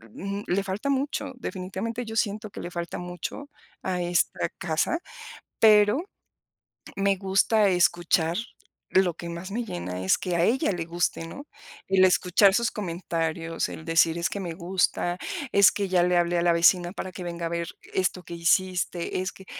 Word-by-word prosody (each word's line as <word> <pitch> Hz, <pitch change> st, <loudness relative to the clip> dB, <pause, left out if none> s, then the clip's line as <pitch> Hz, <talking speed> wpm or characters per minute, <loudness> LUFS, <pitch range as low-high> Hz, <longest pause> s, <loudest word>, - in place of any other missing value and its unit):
m 200 Hz, +1 st, -4 dB
le 195 Hz, +3 st, +1 dB
falta 200 Hz, +8 st, -3 dB
mucho, 280 Hz, 0 st, -1 dB
definitivamente, 220 Hz, +4 st, -4 dB
yo 225 Hz, 0 st, -7 dB
siento 215 Hz, -1 st, -1 dB
que -, -, -8 dB
le 175 Hz, -, -6 dB
falta 170 Hz, -1 st, -4 dB
mucho 180 Hz, -, -6 dB, 0.3 s
a 180 Hz, -1 st, -1 dB
esta 175 Hz, 0 st, +1 dB
casa, 175 Hz, -, 0 dB, 0.6 s
pero 210 Hz, +3 st, +6 dB, 1.0 s
me 200 Hz, 0 st, +2 dB
gusta 195 Hz, +3 st, +3 dB
escuchar 175 Hz, -1 st, +2 dB, 0.5 s
lo 185 Hz, -2 st, +3 dB
que 170 Hz, 0 st, -7 dB
más 170 Hz, +3 st, -7 dB
me 240 Hz, +4 st, -2 dB
llena, 90 Hz, -, -5 dB
es 95 Hz, -, +3 dB
que 180 Hz, -2 st, -3 dB
a 170 Hz, -, +2 dB
ella 250 Hz, -, +2 dB
le 175 Hz, -3 st, -3 dB
guste, 170 Hz, -1 st, -1 dB
¿no?, 280 Hz, -, -9 dB, 0.4 s
el 190 Hz, -1 st, +5 dB
escuchar 185 Hz, +2 st, +4 dB
sus 235 Hz, +1 st, +1 dB
comentarios, 165 Hz, -3 st, -3 dB
el 160 Hz, -, -9 dB
decir: 165 Hz, 0 st, +3 dB
"Es 170 Hz, +1 st, 0 dB
que 200 Hz, -, -4 dB
me 175 Hz, -4 st, -4 dB
gusta, 180 Hz, 0 st, 0 dB, 0.3 s
es 200 Hz, -1 st, +6 dB
que 200 Hz, -1 st, -2 dB
ya 180 Hz, -1 st, +3 dB
le 180 Hz, 0 st, +3 dB
hablé 175 Hz, 0 st, +2 dB
a -, -, +1 dB
la 175 Hz, -1 st, +4 dB
vecina 175 Hz, +1 st, +4 dB
para 185 Hz, -2 st, -5 dB
que 180 Hz, -, -8 dB
venga 170 Hz, -1 st, -4 dB
a -, -, -5 dB
ver 170 Hz, 0 st, -2 dB, 0.3 s
esto 185 Hz, -1 st, 0 dB
que -, -, -9 dB
hiciste 180 Hz, +1 st, 0 dB
es 185 Hz, -, -3 dB
que" 190 Hz, -, -15 dB
180 Hz, 180 wpm, -26 LUFS, 170-200 Hz, 1.0 s, pero